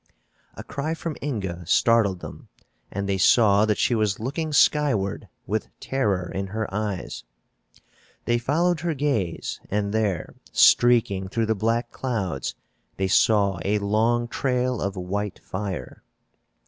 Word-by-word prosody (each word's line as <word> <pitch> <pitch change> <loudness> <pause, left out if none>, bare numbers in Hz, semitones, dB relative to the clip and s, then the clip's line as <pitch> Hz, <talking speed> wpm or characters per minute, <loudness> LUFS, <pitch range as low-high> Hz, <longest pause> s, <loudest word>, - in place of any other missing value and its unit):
A - - -8
cry 155 +4 -3
from 165 -2 -5
Inga 95 -11 -3
startled 105 -5 +3
them - - -10 0.4
and 100 0 -3
they 95 -1 0
saw 105 0 +5
that 105 -1 +1
she - - +2
was 105 -3 +1
looking 145 +7 -3
skyward, 140 -10 +2 0.2
with 110 +2 -2
terror 100 -10 -1
in 95 0 -3
her 110 +2 -3
eyes. 105 -3 -3 1.0
They 120 0 +2
followed 165 +7 +1
her 165 0 -2
gaze 130 - -1
and 100 0 -1
there, 105 -6 -1 0.2
streaking 115 -6 +4
through 115 +4 -1
the 110 - +1
black 115 +3 -1
clouds, 100 - -3 0.4
they 95 - 0
saw 100 -1 +3
a 105 +2 +1
long 110 +4 +1
trail 125 -1 -1
of 100 0 -2
white 100 +2 -3
fire. 95 -9 -6
110 Hz, 135 wpm, -24 LUFS, 95-125 Hz, 1.0 s, saw